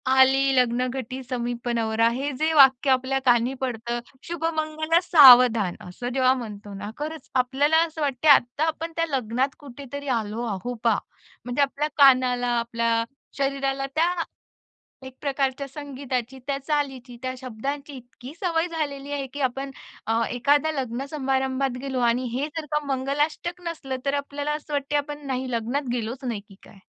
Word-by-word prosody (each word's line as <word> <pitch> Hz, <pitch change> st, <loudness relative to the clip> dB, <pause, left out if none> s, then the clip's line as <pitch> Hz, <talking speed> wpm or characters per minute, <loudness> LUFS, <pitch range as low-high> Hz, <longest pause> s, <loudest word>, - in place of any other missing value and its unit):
"आली 270 Hz, +1 st, +5 dB
लग्नघटी 255 Hz, +1 st, 0 dB
समीप, 240 Hz, -1 st, -3 dB
नवरा" 225 Hz, 0 st, +2 dB
हे 275 Hz, +5 st, -2 dB
जे 315 Hz, +1 st, +2 dB
वाक्य 270 Hz, -2 st, +6 dB
आपल्या 260 Hz, +1 st, +1 dB
कानी 245 Hz, +1 st, +3 dB
पडतं, 240 Hz, -1 st, -3 dB, 0.3 s
"शुभमंगल 315 Hz, -1 st, 0 dB
सावधान" 250 Hz, -, +7 dB
असं 240 Hz, +7 st, -5 dB
जेव्हा 260 Hz, -1 st, +4 dB
म्हणतो 205 Hz, -1 st, -9 dB
ना, 205 Hz, +2 st, -6 dB
खरंच 310 Hz, +2 st, -6 dB
आपल्याला 290 Hz, +5 st, +3 dB
असं 315 Hz, 0 st, -8 dB
वाटतं, 285 Hz, +1 st, +1 dB
आत्ता 275 Hz, +2 st, +5 dB
आपण 325 Hz, +1 st, -3 dB
त्या 330 Hz, 0 st, +1 dB
लग्नात 260 Hz, +1 st, -1 dB
कुठेतरी 285 Hz, 0 st, -9 dB
आलो 220 Hz, +2 st, -4 dB
आहो 245 Hz, +6 st, -4 dB
बा, 230 Hz, -3 st, +3 dB, 0.5 s
म्हणजे 245 Hz, +3 st, -1 dB
आपल्या 280 Hz, +2 st, +1 dB
कानाला, 255 Hz, -3 st, +5 dB
आपल्या 230 Hz, 0 st, 0 dB, 0.3 s
शरीराला 275 Hz, 0 st, -1 dB
त्या 330 Hz, +2 st, +3 dB, 1.0 s
एक 260 Hz, -, -10 dB
प्रकारच्या 275 Hz, -1 st, -1 dB
संगीताची, 265 Hz, -3 st, -5 dB
त्या 280 Hz, -1 st, -1 dB
चालीची, 270 Hz, -5 st, -2 dB
त्या 255 Hz, -, -2 dB
शब्दांची 275 Hz, +4 st, -5 dB
इतकी 250 Hz, +1 st, -12 dB
सवय 335 Hz, -2 st, +1 dB
झालेली 285 Hz, -3 st, -4 dB
आहे, 275 Hz, -2 st, -2 dB
की 290 Hz, -, -6 dB
आपण 270 Hz, +2 st, -1 dB, 0.4 s
अ, 225 Hz, +1 st, +1 dB
एखाद्या 285 Hz, +5 st, +2 dB
लग्न 260 Hz, -2 st, -3 dB
समारंभात 265 Hz, -2 st, -1 dB
गेलो 265 Hz, -2 st, -3 dB
आणि 250 Hz, +2 st, -1 dB
हे 280 Hz, -, 0 dB
जर 310 Hz, -2 st, -3 dB
का 300 Hz, 0 st, 0 dB
मंगलाष्टक 290 Hz, +6 st, -1 dB
नसलं, 270 Hz, -5 st, -4 dB
तर 275 Hz, -, +1 dB
आपल्याला 285 Hz, +1 st, -3 dB
असं 300 Hz, -, -12 dB
वाटतं, 285 Hz, +1 st, 0 dB
आपण 290 Hz, 0 st, -4 dB
नाही, 260 Hz, -1 st, -2 dB
लग्नात 245 Hz, +4 st, -2 dB
गेलोच 245 Hz, +3 st, -4 dB
नाही 230 Hz, -4 st, -2 dB
की 195 Hz, -, -15 dB
काय? 200 Hz, -, -16 dB
270 Hz, 155 wpm, -25 LUFS, 245-290 Hz, 1.0 s, सावधान